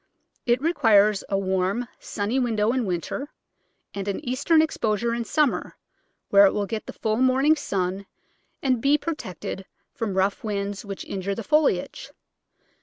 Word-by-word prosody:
It 240 0 +3
requires 215 - +4
a 195 - +1
warm, 190 +4 0
sunny 215 +6 -2
window 225 -3 +1
in 255 -2 0
winter, 185 - -3 0.6
and 200 0 -5
an 200 - -1
eastern 285 +6 +3
exposure 235 -7 +1
in 235 0 -2
summer, 300 +2 0 0.5
where 200 0 +8
it - - 0
will 205 - 0
get 220 +1 -5
the - - -6
full 220 -1 -1
morning 260 +4 +4
sun 195 -7 -2 0.6
and 255 -4 +1
be 280 +3 +4
protected 235 - -5 0.3
from 225 -7 -3
rough 190 +1 +1
winds 200 -2 -3
which 200 -2 -7
injure 195 0 -3
the 230 - -5
foliage. 300 +7 +1
215 Hz, 150 wpm, -25 LUFS, 200-260 Hz, 0.6 s, where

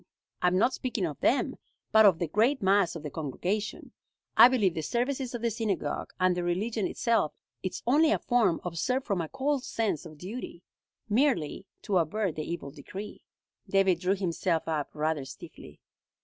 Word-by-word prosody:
I 180 - +3
am 180 +1 +3
not 240 +6 +3
speaking 255 - -2
of - - -5
them, - - +1 0.3
but 220 -1 +7
of 185 -5 +4
the 170 - -1
great 230 - +2
mass 190 -3 +3
of 160 - -7
the 150 - -5
congregation. 180 +9 -3 0.4
I - - +10
believe 220 -9 +2
the 160 - -3
services 250 - -2
of 235 - -5
the 235 - +1
synagogue, 200 -10 -2
and 185 -1 +3
their 175 - -2
religion 200 +5 -1
itself, 230 -10 +1 0.3
is 185 - -4
only 300 +6 +4
a - - +3
form 240 -9 +2
observed 250 +10 -1
from 195 -5 0
a 160 - -5
cold 275 0 -1
sense 215 - -2
of 155 -1 -13
duty, 180 0 -7 0.4
merely 215 - +1 0.2
to 195 -5 +2
avert 180 +3 0
the 155 - -3
evil 140 -5 -5
decree." 185 +8 -9 0.5
David 195 -3 +3
drew 185 +2 +1
himself 175 -3 -1
up 155 -3 -1
rather 155 -1 0
stiffly. 135 - -12
195 Hz, 175 wpm, -29 LUFS, 165-230 Hz, 0.5 s, I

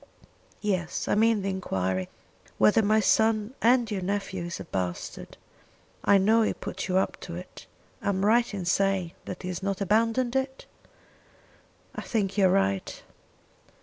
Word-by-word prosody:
"Yes; 185 -4 -2
I - - +2
mean 220 -1 +3
the 195 - -1
enquiry 95 - -2 0.5
whether 225 +2 +5
my 215 +1 +3
son 220 +2 +2
and 240 -1 +3
your 195 -2 -2
nephew 190 -1 -3
is 175 - -5
a - - -5
bastard. 90 - -5 0.7
I 200 - +5
know 220 +4 +4
he 220 - +1
put - - -5
you 185 -1 +1
up 190 - 0
to 170 - -7
it. 180 +1 -10 0.3
Am 195 -1 0
I - - +4
right 235 +2 +3
in 195 -4 -4
saying 190 -1 +1
that 185 - -7
he 180 - -4
has 180 0 -4
not 195 -1 -2
abandoned 230 +5 +1
it?" 265 0 -2 1.3
"I - - -5
think 200 -5 -1
you 195 -2 +4
are - - +2
right." 95 0 0
195 Hz, 165 wpm, -27 LUFS, 180-220 Hz, 1.3 s, whether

